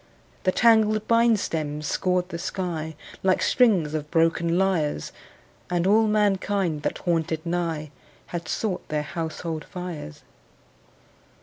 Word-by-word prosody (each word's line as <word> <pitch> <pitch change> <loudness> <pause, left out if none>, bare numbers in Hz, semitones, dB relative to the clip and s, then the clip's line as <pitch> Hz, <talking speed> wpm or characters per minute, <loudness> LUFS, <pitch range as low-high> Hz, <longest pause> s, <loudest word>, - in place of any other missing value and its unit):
The 185 - +4
tangled 215 -1 +4
bine 230 -1 +4
stems 150 -5 -3
scored 180 +2 0
the 170 - -5
sky 165 -4 -3 0.3
Like 190 -1 +2
strings 190 - +3
of 150 -1 -3
broken 165 +1 +2
lyres, 170 - 0 0.6
And 175 -1 0
all 215 +3 +4
mankind 200 -5 +1
that - - -2
haunted 165 -2 -1
nigh 165 -3 -2 0.4
Had 170 -2 -4
sought 200 +2 -2
their 150 -1 -1
household 160 0 -4
fires. 175 - -7
175 Hz, 120 wpm, -25 LUFS, 160-195 Hz, 0.6 s, The